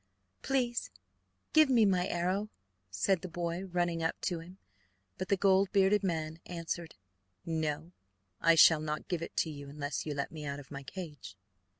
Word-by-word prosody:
"Please 250 Hz, -3 st, 0 dB, 0.6 s
give 310 Hz, -2 st, +6 dB
me 235 Hz, -4 st, +5 dB
my 185 Hz, -2 st, +2 dB
arrow," 185 Hz, +5 st, -1 dB, 0.4 s
said 130 Hz, -, +1 dB
the 185 Hz, -, -6 dB
prince, 175 Hz, +2 st, -3 dB
running 175 Hz, -1 st, 0 dB
up 160 Hz, -, -1 dB
to 175 Hz, -2 st, -1 dB
him; 175 Hz, +3 st, -12 dB, 0.6 s
but 185 Hz, -, -2 dB
the 200 Hz, -, +2 dB
gold 195 Hz, 0 st, +4 dB
bearded 200 Hz, 0 st, +4 dB
man 160 Hz, -3 st, -2 dB
answered: 170 Hz, -1 st, -4 dB, 0.5 s
"No, 160 Hz, 0 st, -2 dB, 0.5 s
I 165 Hz, 0 st, +6 dB
shall 160 Hz, -1 st, +8 dB
not 155 Hz, 0 st, -3 dB
give 175 Hz, -3 st, -2 dB
it -, -, -7 dB
to 160 Hz, -, +1 dB
you 145 Hz, -1 st, -8 dB
unless 145 Hz, 0 st, -3 dB
you 150 Hz, -, -2 dB
let 140 Hz, -, -2 dB
me 155 Hz, -1 st, -7 dB
out 140 Hz, -1 st, -4 dB
of 140 Hz, -, -13 dB
my 140 Hz, -1 st, -6 dB
cage." 140 Hz, -, -8 dB
170 Hz, 175 wpm, -32 LUFS, 155-190 Hz, 0.6 s, shall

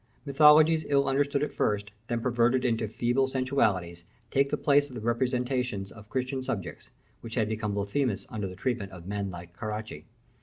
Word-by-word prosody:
Mythologies 155 Hz, +3 st, +6 dB
ill 140 Hz, -1 st, +3 dB
understood 140 Hz, +1 st, +1 dB
at -, -, -3 dB
first, 105 Hz, 0 st, -1 dB, 0.2 s
then 120 Hz, -2 st, -1 dB
perverted 120 Hz, +1 st, +2 dB
into 115 Hz, -2 st, +1 dB
feeble 120 Hz, +5 st, +1 dB
sensualities, 105 Hz, -11 st, 0 dB, 0.3 s
take 140 Hz, +1 st, +2 dB
the -, -, -1 dB
place 145 Hz, 0 st, +3 dB
of 130 Hz, -, -11 dB
the -, -, -4 dB
representations 125 Hz, -3 st, -1 dB
of 110 Hz, -1 st, -14 dB
Christian 130 Hz, +1 st, -2 dB
subjects, 100 Hz, -8 st, -5 dB, 0.3 s
which 115 Hz, -1 st, -8 dB
had 110 Hz, -4 st, +1 dB
become 105 Hz, -2 st, -2 dB
blasphemous 100 Hz, +3 st, -1 dB
under 105 Hz, -3 st, -3 dB
the 90 Hz, -, -8 dB
treatment 105 Hz, -1 st, -2 dB
of 90 Hz, -2 st, -11 dB
men 100 Hz, 0 st, -3 dB
like 85 Hz, -1 st, -9 dB
the -, -, -29 dB
Caracci. 110 Hz, 0 st, -5 dB
120 Hz, 180 wpm, -28 LUFS, 105-135 Hz, 0.3 s, Mythologies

